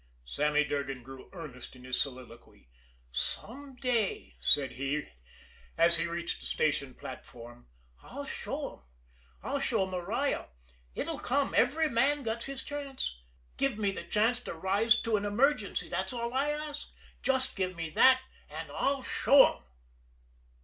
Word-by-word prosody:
Sammy 150 - +2
Durgan 140 -3 -3
grew 135 +1 -11
earnest 150 -9 -9
in 125 - -14
his 130 0 0
soliloquy. 125 - -8 0.4
"Some 265 - -4
day," 245 - 0
said 130 - +5
he, 140 +3 -2 0.7
as 170 +1 +5
he 165 +1 0
reached 170 0 -3
the - - -6
station 140 -4 0
platform, 120 - -10 0.3
"I'll - - -7
show - - -4
'em - - -27 0.6
I'll - - -1
show 190 - +1
Maria! 190 +9 -1 0.5
It'll - - -3
come, 275 +2 0
every 315 +2 +4
man 275 +3 +2
gets 230 0 -2
his 270 -1 -5
chance. 280 - -4 0.4
Give 275 -6 +1
me 205 -2 +1
the - - -5
chance 220 +7 +2
to - - -6
rise 200 +7 +3
to 225 -2 +2
an 200 - -3
emergency, 215 +1 +2
that's 190 +5 -2
all 235 0 -3
I 275 +3 +2
ask 300 0 -4 0.3
just 260 -1 +1
give 185 -1 -1
me 165 -1 -4
that 260 +8 +6 0.3
and - - -7
I'll 275 -1 0
show 275 0 +6
'em!" - - -25
200 Hz, 150 wpm, -31 LUFS, -, 0.7 s, that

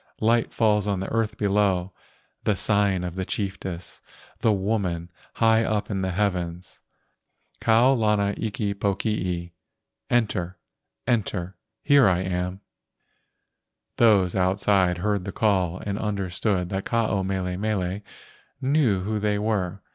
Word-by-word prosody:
Light 115 +1 +2
falls 105 -2 +2
on 100 -2 0
the 95 - -4
earth 115 -1 0
below. 100 -3 +1 0.5
The 105 - +2
sign 100 -1 +1
of 90 -1 -4
the 95 +1 -3
chiefess, 95 -3 -5 0.4
The 110 - +3
woman 95 -4 -1 0.2
high 115 0 +4
up 110 -1 -1
in 95 -2 -1
the 95 - -1
heavens, 90 -3 -2 0.8
Kau 115 +4 +4
lana 105 -4 +2
iki 105 -2 -2
pokii, 95 -3 -2 0.6
Enter, 95 -7 0 0.5
enter, 100 -6 -1 0.3
here 145 -5 +6
am 90 +1 -1
I." - - -52 1.3
Those 100 -6 +4
outside 95 -1 +2
heard 100 +1 0
the 100 - -5
call 95 -5 +1
and 100 0 -2
understood 95 -2 -1
that 95 0 -3
Ke - - -8
ao 110 -4 +1
mele 95 -1 -2
mele 100 -1 -2 0.6
knew 130 -8 +2
who 105 +3 -2
they 105 0 0
were. 100 -3 -1
100 Hz, 130 wpm, -25 LUFS, 90-105 Hz, 1.3 s, here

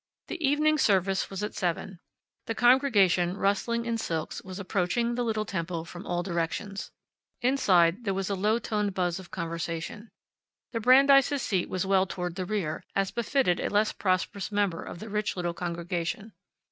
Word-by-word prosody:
The 350 -2 -5
evening 300 +2 +3
service 195 -4 +2
was 195 +1 -5
at 210 - -3
seven. 180 +1 -3 0.5
The 225 - -2
congregation, 205 -9 +4
rustling 230 +4 0
in 230 -1 -1
silks, 165 -6 -3
was 185 -1 -8
approaching 200 +5 0
the 245 - -1
little 220 -2 -1
temple 170 -3 -3
from 175 +3 -10
all 175 0 -1
directions. 190 +3 -3 0.5
Inside, 195 -7 +3
there 195 -3 0
was 195 -1 -2
a 200 - -1
low 210 +4 +2
toned 210 -4 -2
buzz 180 -1 0
of 185 - -11
conversation. 170 +4 -5 0.6
The 230 - -2
Brandeis' 275 +3 +5
seat 185 -3 0
was 185 0 -1
well 190 0 +3
toward 180 -1 -4
the 185 +1 -4
rear, 180 -6 -2
as 195 -1 +1
befitted 235 -6 +1
a - - -1
less 210 +1 +2
prosperous 190 +1 -1
member 205 -5 0
of - - -8
the 215 - -8
rich 210 0 -2
little 175 -1 -1
congregation. 175 +5 -4
195 Hz, 170 wpm, -28 LUFS, 175-225 Hz, 0.6 s, Brandeis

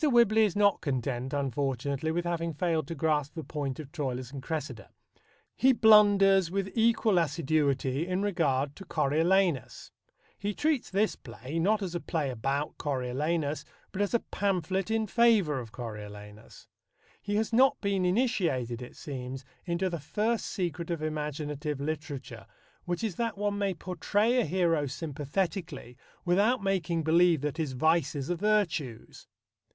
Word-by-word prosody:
Whibley 235 -6 +5
is 200 - -2
not 205 -1 +3
content, 130 -1 -2
unfortunately, 140 +1 -1
with 175 +2 -1
having 170 -2 -2
failed 160 -3 0
to 165 - -5
grasp 150 -1 0
the 160 - -5
point 145 -4 -4
of 145 -3 -8
Troilus 130 -5 -4
and 140 -2 -7
Cressida. 135 -8 -5 0.7
He 265 +1 +4
blunders 205 -5 +6
with 195 +1 -2
equal 225 -4 +3
assiduity 145 -2 0
in 185 +2 -1
regard 145 -8 0
to 195 - -10
Coriolanus. 165 - +1 0.5
He 205 0 -2
treats 305 -4 0
this 205 +3 +1
play, 130 +5 -6
not 210 +5 +2
as 180 -3 -4
a 175 - -1
play 155 -5 -2
about 135 +5 -2
Coriolanus, 145 +3 -1 0.3
but 200 - -3
as 205 +3 +1
a 235 - +2
pamphlet 190 -1 0
in 220 0 +1
favour 215 - +3
of 115 -3 -8
Coriolanus. 105 -2 -9 0.5
He 205 0 -2
has 220 +1 0
not 265 +3 +5
been 200 -2 0
initiated, 180 - 0
it 125 - -9
seems, 130 -3 -6 0.2
into 170 +2 0
the 170 -2 -3
first 215 +10 -1
secret 175 -3 -3
of 165 -3 -2
imaginative 150 -1 -3
literature, 140 -7 -5 0.4
which 175 +3 -2
is 210 -7 -2
that 230 -3 -1
one 205 0 -1
may 195 -2 0
portray 205 +8 +1
a - - 0
hero 165 -5 +1
sympathetically 150 - -4 0.3
without 205 +6 +2
making 175 -4 0
believe 165 -1 +4
that 150 +1 -3
his 155 -5 -2
vices 155 +1 +1
are - - +1
virtues. 175 - -1
165 Hz, 150 wpm, -29 LUFS, 140-195 Hz, 0.7 s, blunders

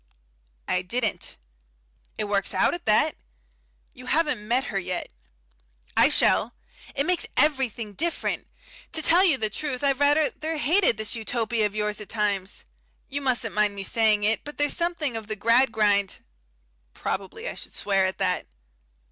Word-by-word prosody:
"I 180 - +1
didn't." 220 +3 -2 0.8
"It - - -1
works 200 -1 -1
out - - +3
at 345 -6 -7
that." 215 - +3 0.8
"You 250 0 -12
haven't 295 -8 0
met 250 +3 +2
her 195 - +1
yet." 180 -1 -4 0.9
"I - - +6
shall. - - +2 0.4
It 280 - +1
makes 360 0 +1
everything 255 -7 +1
different. 330 +8 -2 0.5
To 315 - +2
tell 350 +5 +6
you 330 -8 +4
the 215 -3 -2
truth 285 -1 -4
I've 275 -1 +2
rather 290 +1 +3 0.3
hated 325 - +3
this 220 +2 -3
Utopia 225 0 0
of 205 - -12
yours 210 0 -2
at 210 - -9
times. 205 -3 -2 0.4
You 285 +1 -3
mustn't 245 -4 0
mind 210 -1 +1
my 195 - -4
saying 215 0 +2
it, 220 +2 +1
but 295 - -9
there's 290 0 +1
something 340 -7 -1
of 220 -2 -5
the 215 - -3
Gradgrind 215 -4 +2 0.3
" - - -42
Probably 200 - -4
I - - -3
should - - -9
swear 195 -2 +1
at 185 - -4
that. 180 0 -1
225 Hz, 160 wpm, -25 LUFS, 205-285 Hz, 0.9 s, I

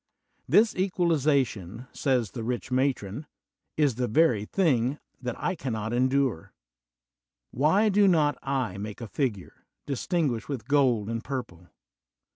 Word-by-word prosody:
This 220 +1 +4
equalization, 140 - 0
says 125 -7 0
the 115 - -6
rich 125 +2 -3
matron, 130 -1 -1 0.5
is 145 -4 +3
the 125 -1 0
very 120 -5 +3
thing 135 - +1 0.2
that 125 -2 -3
I 180 - -1
cannot 115 - -4
endure. 130 -6 0 1.0
Why 160 - +3
do 205 0 +4
not 150 -6 +3
I 130 -9 -2
make 105 0 -6
a 115 - -6
figure, 105 -6 -4 0.2
distinguished 140 - -1
with 125 -6 -5
gold 130 -7 +2
and 115 0 -3
pur 135 -2 -3
ple? 90 -3 -19
130 Hz, 130 wpm, -27 LUFS, 115-150 Hz, 1.0 s, This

